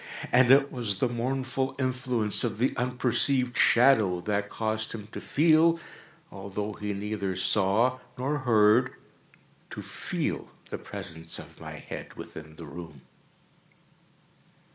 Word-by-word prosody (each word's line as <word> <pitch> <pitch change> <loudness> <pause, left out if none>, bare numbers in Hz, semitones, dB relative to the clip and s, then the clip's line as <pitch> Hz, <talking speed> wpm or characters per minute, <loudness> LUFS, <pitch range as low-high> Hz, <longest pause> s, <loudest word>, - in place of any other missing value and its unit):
And 125 0 +5
it 140 +1 +5
was 115 -6 0
the 125 - +1
mournful 130 +2 -2
influence 125 -5 0
of 115 -4 -2
the 125 +4 +1
unperceived 125 +1 +1
shadow 110 -8 +5
that 100 +1 -1
caused 110 0 -2
him 105 -3 -7
to - - -7
feel—although 155 - 0
he 105 0 -4
neither 100 -1 -3
saw 105 +7 +2 0.2
nor 140 +4 -1
heard—to 120 0 0
feel - - -3 0.2
the - - -4
presence 80 0 -5
of - - -12
my - - -7
head - - -8
within 80 0 -10
the 85 - -9
room. 75 -2 -10
115 Hz, 120 wpm, -28 LUFS, 100-130 Hz, 0.2 s, And